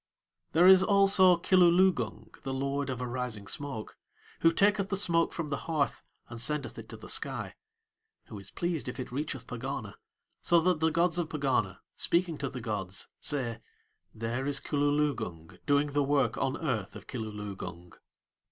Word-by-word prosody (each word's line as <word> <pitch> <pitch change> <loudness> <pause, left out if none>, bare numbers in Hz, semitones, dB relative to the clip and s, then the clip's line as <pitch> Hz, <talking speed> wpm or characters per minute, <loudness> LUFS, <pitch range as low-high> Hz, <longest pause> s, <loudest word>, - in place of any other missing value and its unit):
There 170 +3 +5
is 190 0 +9
also 195 -2 +5
Kilooloogung, 175 - +2
the 135 -1 -4
lord 140 +1 -1
of 125 -1 -3
arising 125 -4 -4
smoke, 135 -1 -5 0.4
who 165 - +5
taketh 200 +3 +2
the 195 - 0
smoke 170 -4 +3
from 165 -3 -4
the 140 - -1
hearth 150 -4 0 0.3
and 115 -1 -8
sendeth 145 +2 -2
it - - -11
to - - -8
the - - -11
sky, - - -2 0.7
who 105 - -9
is 100 -1 -10
pleased 170 -3 -2
if 125 - -7
it 130 - -5
reacheth 140 -1 -4
Pegana, 125 -4 -5 0.5
so 170 - +4
that 180 -1 +2
the 160 +1 +3
gods 170 +2 +1
of 165 -2 -2
Pegana, 130 -11 0 0.2
speaking 170 -3 +1
to 140 - -2
the 125 -2 -7
gods, 100 -4 -4
say: 125 -6 -2 0.5
"There 115 +4 -3
is 140 -1 +1
Kilooloogung 140 - -1
doing 145 0 +3
the 145 +1 +2
work 140 0 +2
on 135 - -1
earth 125 - -2
of - - -10
Kilooloogung." 105 -6 -7
140 Hz, 160 wpm, -30 LUFS, 115-165 Hz, 0.7 s, is